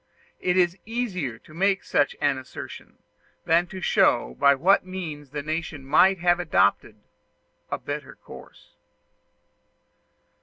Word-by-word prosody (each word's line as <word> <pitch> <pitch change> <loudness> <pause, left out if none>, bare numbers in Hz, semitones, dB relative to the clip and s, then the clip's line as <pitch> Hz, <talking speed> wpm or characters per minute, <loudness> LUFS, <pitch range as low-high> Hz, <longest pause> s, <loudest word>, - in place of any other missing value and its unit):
It 180 0 0
is 175 0 +2
easier 195 - -3
to 155 - -18
make 195 +3 +1
such 145 - +1
an 140 -2 +1
assertion 130 - -10 0.5
than 170 +2 +3
to 185 +1 -8
show 60 - +2
by 140 0 +5
what 185 +9 +3
means 165 -6 -7
the 145 +1 -5
nation 155 -2 -4
might 185 +7 +4
have 175 0 +2
adopted 110 - +1 0.7
a - - -2
better - - -6
course. - - -15
170 Hz, 125 wpm, -25 LUFS, 145-185 Hz, 0.7 s, by